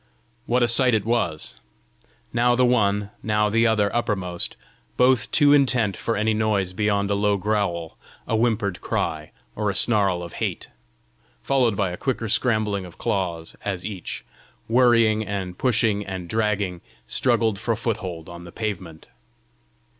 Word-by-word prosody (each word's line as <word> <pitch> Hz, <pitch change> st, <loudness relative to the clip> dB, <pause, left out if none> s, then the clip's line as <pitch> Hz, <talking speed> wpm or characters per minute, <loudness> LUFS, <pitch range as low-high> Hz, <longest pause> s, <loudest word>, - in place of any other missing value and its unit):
What 125 Hz, +1 st, +2 dB
a -, -, +4 dB
sight 125 Hz, +1 st, +4 dB
it 105 Hz, -, -1 dB
was 85 Hz, -, -2 dB, 0.7 s
now 120 Hz, +1 st, +3 dB
the 125 Hz, +1 st, +3 dB
one, 105 Hz, -4 st, +1 dB
now 105 Hz, -1 st, +1 dB
the 115 Hz, +2 st, +3 dB
other 105 Hz, -2 st, +1 dB
uppermost, 95 Hz, -6 st, -2 dB, 0.4 s
both 125 Hz, -2 st, +3 dB
too 145 Hz, -2 st, +5 dB
intent 125 Hz, -8 st, +3 dB
for 115 Hz, +4 st, -2 dB
any 110 Hz, +1 st, +1 dB
noise 105 Hz, -4 st, 0 dB
beyond 100 Hz, 0 st, 0 dB
a -, -, +3 dB
low 100 Hz, 0 st, +1 dB
growl, 95 Hz, -5 st, -2 dB, 0.3 s
a 115 Hz, -, 0 dB
whimpered 110 Hz, -5 st, 0 dB
cry, 75 Hz, -1 st, -2 dB, 0.3 s
or 105 Hz, -1 st, -1 dB
a 100 Hz, -, -2 dB
snarl 100 Hz, -6 st, +3 dB
of 85 Hz, -, -9 dB
hate -, -, -3 dB, 0.7 s
followed 125 Hz, -6 st, +2 dB
by 95 Hz, -3 st, 0 dB
a 90 Hz, -, -6 dB
quicker 120 Hz, -4 st, -2 dB
scrambling 110 Hz, -3 st, +1 dB
of 90 Hz, -2 st, -12 dB
claws, 85 Hz, -4 st, -2 dB
as 95 Hz, -3 st, -3 dB
each, 100 Hz, -4 st, -6 dB, 0.4 s
worrying 115 Hz, -2 st, +4 dB
and 95 Hz, -3 st, -5 dB
pushing 110 Hz, -4 st, +1 dB
and 95 Hz, -3 st, -6 dB
dragging, 100 Hz, -3 st, -1 dB, 0.2 s
struggled 115 Hz, -, +1 dB
for 115 Hz, 0 st, -1 dB
foothold 95 Hz, -8 st, -4 dB
on 85 Hz, 0 st, -10 dB
the 85 Hz, -, -11 dB
pavement! 95 Hz, -7 st, -5 dB
105 Hz, 150 wpm, -23 LUFS, 95-115 Hz, 0.7 s, too